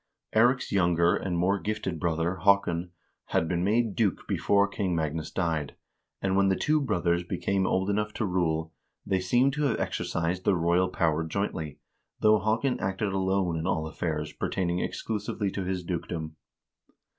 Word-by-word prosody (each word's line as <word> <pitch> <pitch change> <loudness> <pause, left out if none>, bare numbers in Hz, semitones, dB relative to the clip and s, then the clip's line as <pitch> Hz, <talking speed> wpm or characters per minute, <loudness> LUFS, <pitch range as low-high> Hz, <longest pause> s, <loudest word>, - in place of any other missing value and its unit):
Eirik's 125 +4 +3
younger 85 -3 +3
and 90 -3 -2
more 95 +3 +2
gifted 105 -5 -3
brother, 85 +2 0
Haakon, 90 -2 +2 0.4
had 80 - 0
been 85 +1 0
made 110 +1 +1
duke 105 -7 0
before 100 0 +2
King 100 -3 -2
Magnus 80 -1 -2
died, 80 -5 -2 0.5
and 95 -1 +1
when 100 0 +4
the 95 - +3
two 150 +8 +1
brothers 85 -9 +1
became 95 +2 -1
old 95 +1 +1
enough 105 +1 0
to 110 - -1
rule, 80 -3 0 0.3
they 95 - +1
seem 120 +9 +3
to 150 +2 -1
have 120 -6 +1
exercised 85 +2 -2
the 100 - +3
royal 85 +2 +2
power 80 -2 +1
jointly, 80 -3 -3 0.4
though 110 0 +5
Haakon 115 +6 0
acted 95 +1 -1
alone 95 -2 +1
in 80 - -3
all 80 -4 0
affairs 80 -1 -3
pertaining 90 -2 -1
exclusively 105 -1 -2
to 95 -1 -3
his 90 -1 -2
dukedom. 85 -2 -4
95 Hz, 160 wpm, -28 LUFS, 85-100 Hz, 0.5 s, though